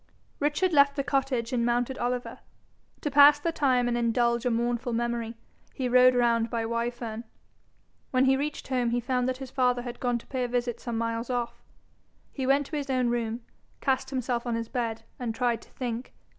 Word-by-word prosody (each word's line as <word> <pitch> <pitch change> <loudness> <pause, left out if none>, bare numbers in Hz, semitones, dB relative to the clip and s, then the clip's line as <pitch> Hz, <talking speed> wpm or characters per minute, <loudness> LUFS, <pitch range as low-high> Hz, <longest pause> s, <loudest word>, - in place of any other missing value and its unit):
Richard 300 +5 +1
left 280 -1 +5
the 275 - -1
cottage, 265 -3 -1
and 240 -2 +1
mounted 240 +2 0
Oliver. 245 0 -2 0.6
To 295 - -2
pass 290 +1 +8
the 335 +3 -1
time 255 -6 +2
and 240 - 0
indulge 235 0 +1
a - - +3
mournful 240 +1 -1
memory, 235 0 -2 0.4
he 260 - -1
rode 250 +1 +6
round 235 -1 +2
by 230 -1 -2
Wyfern. 235 -1 -3 0.9
When 255 0 +3
he 265 0 +4
reached 290 +1 -4
home, 250 -3 +1
he 240 +1 +1
found 250 +1 0
that 255 - -2
his 265 -1 -8
father 250 -2 +1
had 245 -1 -7
gone 245 -1 0
to 235 - -11
pay 260 -2 -2
a - - 0
visit 240 -1 -2
some 235 -2 -4
miles 230 +1 -2
off. 245 -2 -2 0.7
He 265 -2 -3
went 280 +1 +3
to 310 - -6
his 280 -1 -4
own 255 -2 +1
room, 235 0 -2 0.4
cast 265 -1 0
himself 250 -2 -2
on 235 - 0
his 230 -1 -3
bed, 230 -3 -3 0.2
and 235 -3 -3
tried 240 -1 0
to - - -17
think. 245 -1 -5
245 Hz, 200 wpm, -27 LUFS, 235-260 Hz, 0.9 s, pass